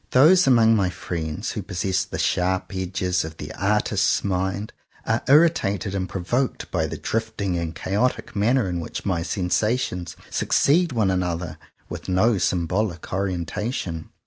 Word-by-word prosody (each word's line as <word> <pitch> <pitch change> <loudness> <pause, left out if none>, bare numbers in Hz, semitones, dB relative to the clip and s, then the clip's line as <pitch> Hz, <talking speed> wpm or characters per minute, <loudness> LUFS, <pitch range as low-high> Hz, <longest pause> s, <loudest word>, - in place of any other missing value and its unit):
Those 160 +6 +6
among 115 -3 +5
my 95 -4 +2
friends 85 +1 -4
who 105 - -4
possess 95 0 -1
the - - -6
sharp 95 +2 0
edges 95 -1 -2
ofthe 80 -2 -3
artist's 105 +2 +1
mind 95 +2 -2 0.3
are 110 +1 +1
irritated 125 - +3
and 95 -2 -2
provoked 120 +9 -2
by - - 0
the - - -5
drifting 110 -4 -2
and 85 -1 -3
chaotic 105 +6 -1
manner 115 +2 +2
in 90 -1 -2
which 80 - -6
my 90 -4 0
sensations 90 +2 -1 0.2
succeed 165 +3 +2
one 110 -6 +1
another 90 -3 -2 0.3
with - - -7
no 100 +3 +3
symbolic 90 +1 -1
orientation. 95 -1 -3
95 Hz, 140 wpm, -23 LUFS, 90-110 Hz, 0.3 s, Those